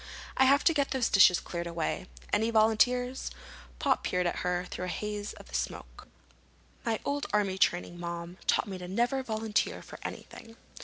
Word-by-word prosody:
"I 265 - +5
have 280 +2 +5
to 330 - +5
get 285 -2 +1
those 260 -3 +1
dishes 185 -3 +7
cleared 170 -1 -5
away. 170 +2 -2 0.3
Any 220 +2 +3
volunteers?" 245 +3 +2 0.5
Pop - - +1
peered 180 0 0
at 175 - 0
her 180 0 -1
through 180 - -5
the - - -4
haze 210 -1 -4
of - - -14
smoke. - - -4 0.8
"My 225 -2 0
old 285 0 -1
army 195 -2 +1
training, 175 -2 +1
Mom, 170 +1 -5
taught - - +3
me 190 -2 -5
never 235 +9 0
to 265 - -2
volunteer 220 -2 -1
for - - -11
anything." 225 0 -8
210 Hz, 170 wpm, -30 LUFS, 180-245 Hz, 0.8 s, dishes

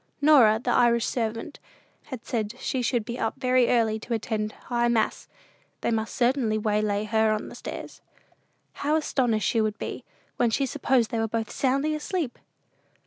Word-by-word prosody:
Norah, 275 -8 +6
the 245 +1 -1
Irish 235 -1 +3
servant, 230 +4 -3 0.5
had 260 -5 -8
said 220 -3 -2
she 260 - -2
should 240 -2 0
be 235 +2 -5
up 225 - -1
very 255 -2 +3
early 225 -2 +2
to 235 +2 -3
attend 215 -1 -2
High 240 -1 -1
Mass: 230 -2 0 0.5
they - - 0
must 220 -1 -2
certainly 245 -3 +2
waylay 210 -1 0
her 220 +1 +2
on 215 0 -2
the - - -11
stairs. - - -8 0.8
How 295 +2 +2
astonished 245 -9 +1
she 225 - +2
would 215 0 -1
be, - - -5 0.3
when 240 - +3
she 270 +5 +1
supposed 260 -3 +1
they 230 - -1
were 225 - +1
both 225 0 -3
soundly 275 +3 +1
asleep! 305 -2 -3
235 Hz, 170 wpm, -26 LUFS, 220-255 Hz, 0.8 s, Norah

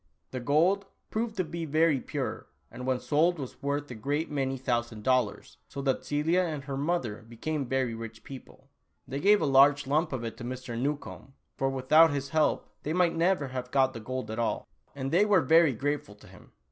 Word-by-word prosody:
The 130 - -4
gold 170 +10 +2 0.2
proved 220 0 -2
to 185 - +2
be 170 +1 -5
very 155 -1 +2
pure - - -4 0.2
and 125 +1 -7
when 130 -1 +1
sold 165 +6 +2
was 135 -4 -8
worth 145 0 -2
a - - -4
great 145 +8 -2
many 135 -2 -1
thousand 120 -4 -2
dollars, 125 -4 0
so 140 - -8
that 135 -1 0
Celia 155 +5 +1
and 155 -6 -3
her 140 -1 -5
mother 140 -7 -1
became 140 +4 -3
very 130 -2 0
rich 115 0 -8
people. 135 -2 -12 0.4
They 135 - -4
gave 205 +5 +5
a - - +2
large 140 +1 +5
lump 155 +5 +1
of 130 -3 -3
it 115 - -5
to - - -8
Mr. 125 0 -5
Newcombe, 140 +1 -4 0.2
for 135 - 0
without 145 +5 +5
his 140 -1 -3
help 155 0 +1
they 155 - -3
might 175 -1 +2
never 165 -4 +1
have 125 -1 -5
got 130 0 +2
the 115 - -6
gold 125 -1 -5
at 110 - -4
all, 115 - -1 0.3
and 135 -1 -3
they 180 +5 +5
were 205 -3 +4
very 160 +1 +5
grateful 140 -4 -3
to 105 - -18
him. - - -17
140 Hz, 205 wpm, -29 LUFS, 130-160 Hz, 0.4 s, gave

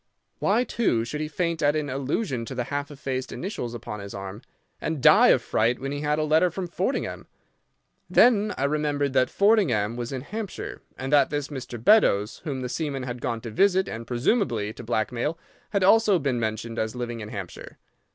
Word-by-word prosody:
Why, 220 +5 +2
too, 160 - 0
should 150 +5 -4
he 155 - -2
faint 170 +1 -2
at 145 +1 +3
an 150 -1 -1
allusion 135 - -2
to 130 - -7
the 125 - -1
half 145 0 -2
effaced 130 -2 -4
initials 145 - -4
upon 105 -2 -6
his 100 0 -8
arm, 95 +2 -7 0.4
and 160 -2 -2
die - - +7
of - - +4
fright 115 +3 +1
when 135 +1 -4
he 145 - -3
had 150 0 +1
a 155 - +1
letter 155 +4 +3
from 180 +2 -4
Fordingbridge? 185 +9 -2 0.8
Then 215 -4 +5
I - - -1
remembered 145 -1 0
that 130 -1 +3
Fordingbridge 150 - +2
was 120 +1 -4
in 130 -2 -3
Hampshire, 210 - -6 0.2
and 135 +2 -3
that 145 - +5
this 145 -1 -3
Mr. 125 -4 -6
Beddoes, 110 - +3
whom 135 -4 -3
the 125 - -3
seaman 140 -1 -3
had 125 -1 -5
gone 115 -1 -2
to 115 - -7
visit 190 - +3
and 115 0 -6
presumably 120 - 0
to - - -10
blackmail, 120 +7 -1 0.3
had 200 -2 0
also 210 0 +5
been 135 -6 -1
mentioned 115 +1 -3
as 110 +2 -2
living 120 -1 -4
in 105 -1 -7
Hampshire. 100 -5 -8
135 Hz, 195 wpm, -25 LUFS, 120-165 Hz, 0.8 s, die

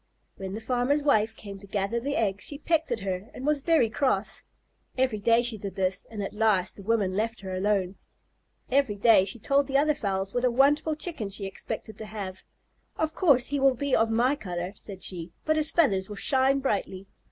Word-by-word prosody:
When 190 0 -5
the 220 - -6
farmer's 255 +5 0
wife 220 -6 +2
came 200 -2 -9
to 200 - -14
gather 200 +3 -1
the 280 +4 -3
eggs 205 -3 -1
she 285 - -5
pecked 320 -1 0
at 230 -3 -1
her 190 +1 -4
and 260 - -6
was 300 -1 +1
very 320 -6 +3
cross. 220 -3 -1 0.6
Every 255 -4 +1
day 230 +3 +3
she 235 -3 +1
did 195 -1 -6
this, 190 -1 -1
and 210 -3 -5
at - - -5
last 210 -4 +1
the - - -11
woman 200 -3 0
let 225 +2 -2
her 190 -1 -6
alone. 195 -1 0 0.7
Every 265 -5 +2
day 205 -2 +5
she 195 +4 -3
told 275 +5 +1
the 275 -1 +2
other 300 +2 +3
fowls 195 -6 -2
what 245 - -1
a 250 - +4
wonderful 285 +5 +3
Chicken 310 - -2
she 200 0 -3
expected 195 +2 -6
to 215 - -7
have. 195 -3 -6 0.6
"Of 315 0 -1
course 275 -9 +4
he 285 +1 -1
will 270 -1 +4
be 280 +2 0
of 225 0 +2
my 240 +5 +2
color," 180 -6 -5
said 195 -2 -9
she, 170 -2 -3
"but 310 - +2
his 310 0 +2
feathers 195 - +2
will 210 - -6
shine 270 +5 +2
brightly. 195 -6 -2
225 Hz, 210 wpm, -27 LUFS, 195-275 Hz, 0.7 s, day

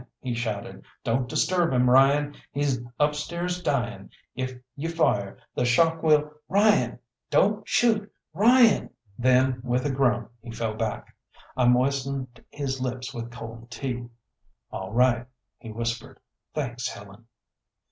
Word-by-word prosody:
he 125 -2 -3
shouted, 110 -4 -4 0.2
"don't 125 +2 0
disturb 175 +4 +2
him, 125 -1 +3
Ryan! 140 +3 +5 0.2
He's 140 -3 0 0.2
upstairs 170 +5 -1
dying. 120 - -2 0.2
If 130 0 -4 0.2
you 155 +3 -3
fire, 105 -12 +1 0.2
the - - 0
shock 160 +7 +3
will 150 -1 +3 0.2
Ryan! 200 - +3 0.3
Don't 210 +1 +2
shoot! 215 -3 +2 0.2
Ryan!" 230 +4 +5 0.3
Then 130 0 +3
with 125 +1 0
a 145 - +1
groan 125 -3 +1
he 120 - -11
fell 115 -1 -3
back. 110 -1 -4 0.4
I 125 -1 +3
moistened 130 -1 0
his 135 -2 -3
lips 125 0 -4
with 120 0 -5
cold 115 0 -9
tea. 120 -1 -4 0.6
"All 95 0 -5
right," 120 +1 +3 0.3
he 115 - -9
whispered, 115 +1 -4 0.4
"thanks, 125 -5 -2
Helen." 100 +3 -11
130 Hz, 130 wpm, -26 LUFS, 120-150 Hz, 0.6 s, Ryan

